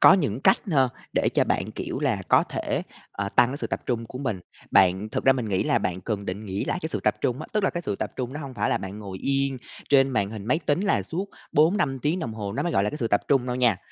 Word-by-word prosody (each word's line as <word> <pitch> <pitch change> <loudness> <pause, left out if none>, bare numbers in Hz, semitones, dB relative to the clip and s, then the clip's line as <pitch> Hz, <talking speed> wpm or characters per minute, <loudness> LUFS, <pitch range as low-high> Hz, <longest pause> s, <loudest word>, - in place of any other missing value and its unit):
Có - - +9
những 140 - +1
cách 190 - +5
ha, 135 -5 +4 0.2
để - - +2
cho - - +4
bạn, 100 - -1
kiểu 110 - -4
là, 120 -10 0
có - - +6
thể, - - -2 0.3
ờ, 100 0 -3
tăng 120 - +6
cái 140 - -4
sự - - -3
tập - - -3
trung 115 -2 -1
của 130 - -8
mình. 110 -9 -2 0.3
Bạn 95 +3 +4
thực 110 - -3
ra 135 - +7
mình 125 -5 -3
nghĩ 95 -2 +1
là - - +3
bạn 90 0 -2
cần 100 +1 -3
định 100 +4 -4
nghĩa 95 +1 -2
lại - - -1
cái 160 - -2
sự - - -3
tập 105 - +2
trung 125 +3 0
á, 155 - -6
tức 210 -2 +1
là - - +3
cái 175 - -4
sự 105 - -2
tập - - -3
trung 125 0 -3
nó 145 - -5
hông 135 -3 -7
phải - - 0
là - - +2
bạn 95 +2 -7
ngồi 95 -3 -7
yên 135 -1 0 0.3
trên 135 -1 +6
màn 100 -5 0
hình 110 -3 -7
máy 150 +7 +2
tính 145 +5 +2
là 200 -1 +2
suốt 190 +4 -4 0.2
4-5 150 -4 +3
tiếng 155 +7 0
đồng 115 -9 -4
hồ 100 -2 -4
nó - - -1
mới 175 - -1
gọi 100 - +3
là 105 - 0
cái - - -5
sự 115 - 0
tập 105 - +3
trung 135 -3 +3
đâu 125 0 -1
nha. 120 -5 +3
125 Hz, 300 wpm, -25 LUFS, 105-145 Hz, 0.3 s, Có